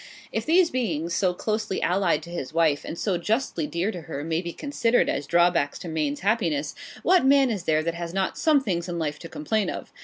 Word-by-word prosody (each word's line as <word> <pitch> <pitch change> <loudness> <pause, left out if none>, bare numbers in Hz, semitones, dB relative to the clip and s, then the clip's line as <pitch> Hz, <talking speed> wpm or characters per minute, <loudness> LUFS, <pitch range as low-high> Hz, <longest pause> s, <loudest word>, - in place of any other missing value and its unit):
If - - -3
these 340 +1 +4
beings, 170 -10 -1
so 180 -2 +1
closely 215 -1 -2
allied 175 -4 +1
to 170 - -10
his 160 -3 -5
wife, 160 -4 +2
and 170 - -6
so 185 -3 0
justly 210 - -1
dear 170 +7 -1
to 175 - -7
her, 145 -2 -6
may 165 +1 -1
be 170 -1 -5
considered 245 - +1
as 145 - -2
drawbacks 170 -4 +2
to - - -8
Maine's 155 -3 -2
happiness, 170 -8 0 0.3
what 365 -2 +4
man 270 -1 +5
is 195 -5 -4
there 155 0 +2
that 170 +1 -1
has 170 0 -5
not 190 +1 -1
some 305 -3 +3
things 175 -5 -2
in 175 - -3
life 150 -2 -2
to - - -9
complain 205 +8 -1
of? - - -7
175 Hz, 220 wpm, -25 LUFS, 160-220 Hz, 0.3 s, man